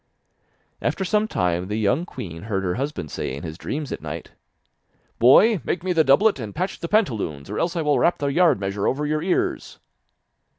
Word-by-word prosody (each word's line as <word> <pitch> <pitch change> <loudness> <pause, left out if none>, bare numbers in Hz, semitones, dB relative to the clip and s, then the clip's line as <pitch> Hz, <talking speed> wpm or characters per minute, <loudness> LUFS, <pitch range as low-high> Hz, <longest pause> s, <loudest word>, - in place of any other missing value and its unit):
After 190 - -1
some 210 +3 +1
time 90 - -1
the 105 - -3
young 125 - +1
queen 85 - -8
heard 95 -2 -1
her 90 -2 0
husband 130 - -4
say - - -4
in 70 - -8
his 80 -2 -6
dreams 145 - -5
at - - -5
night: 80 +1 -7 0.9
'Boy, 180 - +6
make 175 - -2
me 185 -1 0
the 160 -2 +4
doublet, 155 +6 +4
and 105 -4 -6
patch 185 +3 -3
the 170 - -4
pantaloons, 105 - 0
or 105 - -3
else 170 +1 -1
I 165 - 0
will 145 -3 +2
rap 170 - +3
the 145 - -3
yard 150 - +3
measure 100 0 -2
over 145 +3 0
your 155 +1 0
ears. 180 +2 -1
135 Hz, 200 wpm, -23 LUFS, -, 0.9 s, Boy